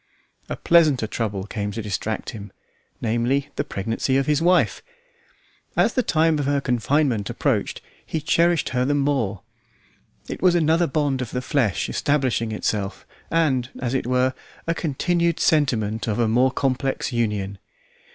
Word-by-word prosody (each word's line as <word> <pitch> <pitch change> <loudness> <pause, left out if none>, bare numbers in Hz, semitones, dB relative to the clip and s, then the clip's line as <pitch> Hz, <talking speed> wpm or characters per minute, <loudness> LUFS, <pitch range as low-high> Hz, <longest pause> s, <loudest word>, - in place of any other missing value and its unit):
A - - -2
pleasanter 155 -8 +4
trouble 105 -3 -3
came 105 0 -4
to 115 - -4
distract 105 +2 -3
him, 105 -4 -9 0.5
namely, 120 +5 0
the - - 0
pregnancy 115 +2 -1
of 135 - +1
his 150 +1 +1
wife. 180 +2 +3 1.0
As - - +3
the 255 - +2
time 160 -6 +2
of 140 - -1
her 145 0 +2
confinement 125 -3 +1
approached - - -1 0.2
he 160 - -3
cherished 170 +2 +2
her 125 -1 0
the 145 +3 +1
more. 135 -9 0 0.8
It - - -6
was 180 -1 +4
another 165 +1 +3
bond 140 -2 0
of 125 - -4
the 125 - -2
flesh 125 - 0
establishing 130 -6 0
itself, 105 -2 -2 0.2
and, 135 -7 +1
as 125 -1 -2
it 130 -2 -1
were, 130 +1 +2 0.3
a 165 - +1
continued 170 +2 0
sentiment 115 -9 +1
of 105 - 0
a 120 -1 +2
more 125 +4 +3
complex 135 0 -1
union. 105 -4 -1
130 Hz, 150 wpm, -23 LUFS, 115-150 Hz, 1.0 s, pleasanter